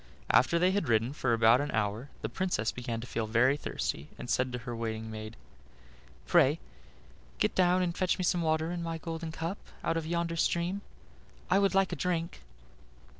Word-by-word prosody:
After 170 +6 +4
they 180 +2 +4
had 190 -8 0
ridden 115 +3 +2
for 130 -4 0
about 115 +2 +5
an 145 - -2
hour 110 +5 -1
the - - 0
Princess 180 -12 -1
began 120 -2 -4
to - - -7
feel 115 -3 -3
very 120 +5 +4
thirsty, 75 - -4
and 120 - -5
said 130 0 +1
to 125 - -3
her 120 0 -6
waiting 110 -1 -4
maid: 110 +1 -7 0.9
"Pray - - +4 0.8
get - - +1
down 185 0 +3
and 170 -1 -1
fetch 185 -1 +1
me 185 - -2
some 175 0 +2
water 160 0 +1
in 175 -1 -3
my 165 -1 -3
golden 165 0 -5
cup 165 +5 -4 0.2
out 165 - 0
of 160 -1 -3
yonder 170 0 -1
stream: 175 +4 0 0.7
I 190 - +5
would 195 -1 +2
like 195 -1 +3
a - - -1
drink." 170 - -2
160 Hz, 190 wpm, -30 LUFS, 115-175 Hz, 0.9 s, about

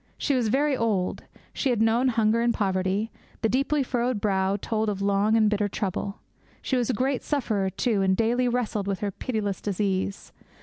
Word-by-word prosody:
She 285 - 0
was 250 -4 +1
very 280 +5 +2
old; 215 -6 -1 0.3
she 275 - 0
had 240 -3 +1
known 225 +3 +3
hunger 225 -1 +2
and 235 0 +3
poverty; 190 +2 0 0.3
the 225 - +3
deeply 275 +3 +1
furrowed 245 -2 -1
brow 195 -1 +1
told 220 +1 -1
of 200 -2 -3
long 200 +2 +2
and 215 -1 +4
bitter 210 -1 +1
trouble. 200 0 -3 0.4
She 265 - -1
was 245 -1 0
a - - +2
great 265 0 0
sufferer, 220 -9 0
too, 210 +1 0
and 190 -1 +2
daily 240 +2 +2
wrestled 230 -5 -1
with 195 -2 -2
her 205 -1 -1
pitiless 205 -2 -3
disease. 195 -1 -2
220 Hz, 185 wpm, -26 LUFS, 200-245 Hz, 0.4 s, and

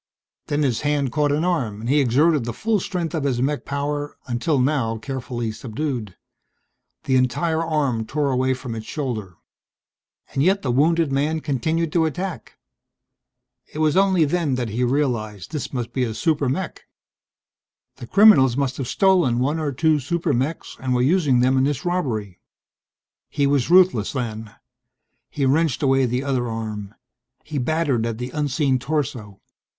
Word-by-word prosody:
Then 150 0 0
his 125 -5 0
hand 145 -3 0
caught 145 +1 +1
an 150 +3 +1
arm 130 - -1
and 115 - -5
he 145 +4 +3
exerted 140 +3 +3
the 120 - -3
full 220 -1 0
strength 175 -2 -3
of 160 -4 -2
his 130 -4 0
mech 140 +3 -1
power, 145 +1 -3
until 125 +5 0
now 125 -4 +1
carefully 125 -2 -4
subdued. 115 - -4 0.9
The 130 - +1
entire 160 +6 +1
arm 140 -9 -1
tore 145 -1 0
away 130 0 +1
from 125 -2 -6
its 110 -1 -7
shoulder. 110 - -4 1.0
And 135 - 0
yet 190 +6 +2
the 130 - 0
wounded 160 +4 +2
man 150 +4 0
continued 160 +3 -1
to 165 -2 +3
attack. 180 +3 -5 1.1
It - - -9
was 155 -1 +2
only 190 -4 +4
then 150 -3 0
that 125 -2 -2
he 115 +4 -1
realized 120 -7 -1
this 150 -4 -4
must 120 -3 -4
be 130 - 0
a 115 -3 -3
super 150 -4 +1
mech. 165 +7 -4 1.1
The 120 - -9
criminals 160 - +6
must 135 -2 -1
have 135 - -3
stolen 180 - +3
one 145 +6 0
or 150 -2 -1
two 155 +3 +2
super 165 +3 -1
mechs 135 +6 -3
and 130 -1 -1
were 125 - +2
using 145 -5 +3
them 130 +1 +3
in - - +3
this 145 +1 -2
robbery. 115 - -2 0.9
He 145 - 0
was 140 -2 +1
ruthless, 180 - +4
then. 110 -4 -5 0.7
He 140 - -1
wrenched 150 0 +1
away 135 -1 +3
the 125 +2 -1
other 130 -3 -1
arm. 110 -3 -5 0.5
He 150 - -4
battered 135 -4 0
at 115 -1 -4
the 125 +2 -5
unseen 140 -2 0
torso. 125 -7 -3
140 Hz, 165 wpm, -22 LUFS, 120-155 Hz, 1.1 s, criminals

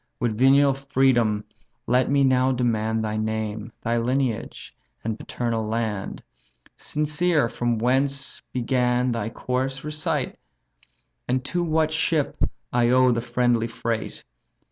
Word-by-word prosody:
With 120 -4 0
venial 135 +3 +5
freedom 130 -6 +2 0.4
let 125 +1 +2
me 140 0 +3
now 130 0 +3
demand 110 -3 0
Thy 110 0 -2
name, 110 0 -3
thy 115 +1 +1
lineage, 125 -1 -2 0.3
and 110 -1 -3
paternal 115 -2 -2
land; 110 -3 -3 0.5
Sincere 150 -1 +1
from 120 0 -1
whence 135 +4 0
began 125 0 +1
thy 115 -2 -2
course, 130 +3 -3
recite, 150 -2 -2 0.9
And 130 +1 0
to 175 +4 -1
what 160 -1 +1
ship 160 -2 +1 0.4
I 120 -1 +3
owe 130 0 +5
the 115 -1 0
friendly 120 -1 +1
freight? 115 -1 -4
125 Hz, 120 wpm, -24 LUFS, 115-135 Hz, 0.9 s, venial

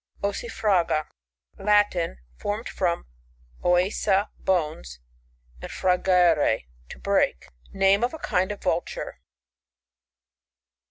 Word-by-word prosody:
Ossifraga. 200 -6 0 0.3
— 60 -2 -31
Latin. 205 -5 +3 0.2
Formed 205 - -3
from 175 -2 -1 0.6
ifisa, 190 +3 +2
bones, 150 - -1 0.6
nnd - - -7
frangere, 180 - +3 0.2
to - - -9
break. 60 +1 0 0.2
Name 195 +2 +3
of 245 - +1
a 320 - -7
kind 185 -9 0
of 205 - -8
Vulture. 175 -1 -2
180 Hz, 95 wpm, -25 LUFS, 165-200 Hz, 0.6 s, Latin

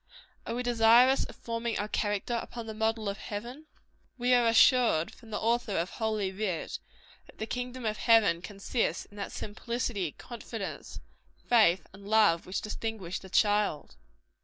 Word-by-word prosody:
Are - - -2
we 250 - -2
desirous 240 +2 +5
of - - -11
forming 230 -1 -3
our 205 - -2
character 205 +2 -1
upon 235 -1 -8
the 220 - -6
model 220 0 -1
of 200 +1 -3
heaven? 240 +9 -7 0.5
We 250 0 +2
are 240 -1 +4
assured, 230 - +4
from 230 - -16
the 210 - -3
Author 230 -2 0
of 170 +3 -1
Holy 215 -4 -1
Writ, 190 -4 -3 0.5
that - - -18
the 220 - -3
kingdom 250 +1 -5
of 215 -1 -1
heaven 210 -8 +4
consists 195 -1 -2
in 205 - -19
that 200 - -5
simplicity, 215 - -3
confidence, 225 -3 -7 0.5
faith 190 -8 +4
and 200 +1 -13
love, 210 -6 +3
which 185 - -2
distinguish 215 -4 -4
the 190 - -12
child. 205 -6 +1
220 Hz, 160 wpm, -29 LUFS, 200-235 Hz, 0.5 s, desirous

